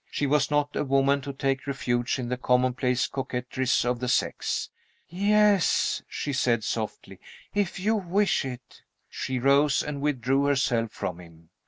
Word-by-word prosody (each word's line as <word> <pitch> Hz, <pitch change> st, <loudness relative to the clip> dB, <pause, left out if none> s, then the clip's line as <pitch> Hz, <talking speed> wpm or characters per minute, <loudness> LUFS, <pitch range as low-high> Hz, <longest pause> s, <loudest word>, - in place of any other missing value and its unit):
She 145 Hz, -, -2 dB
was 145 Hz, +1 st, +2 dB
not 145 Hz, -1 st, 0 dB
a -, -, 0 dB
woman 135 Hz, 0 st, +2 dB
to 140 Hz, +1 st, -5 dB
take 135 Hz, 0 st, -2 dB
refuge 120 Hz, -3 st, -1 dB
in 125 Hz, -2 st, -4 dB
the 125 Hz, -, 0 dB
commonplace 125 Hz, 0 st, +1 dB
coquetries 130 Hz, -1 st, -1 dB
of 120 Hz, 0 st, 0 dB
the 125 Hz, -, -3 dB
sex. 125 Hz, -, -1 dB, 0.4 s
"Yes," 205 Hz, +1 st, +2 dB
she 145 Hz, -, -4 dB
said, 120 Hz, -4 st, +1 dB
softly, 110 Hz, 0 st, -4 dB, 0.3 s
"if 200 Hz, -2 st, -1 dB
you 215 Hz, +4 st, +1 dB
wish 195 Hz, -1 st, +1 dB
it." 130 Hz, -2 st, -9 dB, 0.3 s
She 130 Hz, -1 st, -3 dB
rose 140 Hz, +3 st, +3 dB
and 145 Hz, -1 st, -5 dB
withdrew 135 Hz, -1 st, +1 dB
herself 125 Hz, -5 st, +1 dB
from 90 Hz, -4 st, -5 dB
him. 85 Hz, -2 st, -16 dB
135 Hz, 155 wpm, -26 LUFS, 125-145 Hz, 0.4 s, rose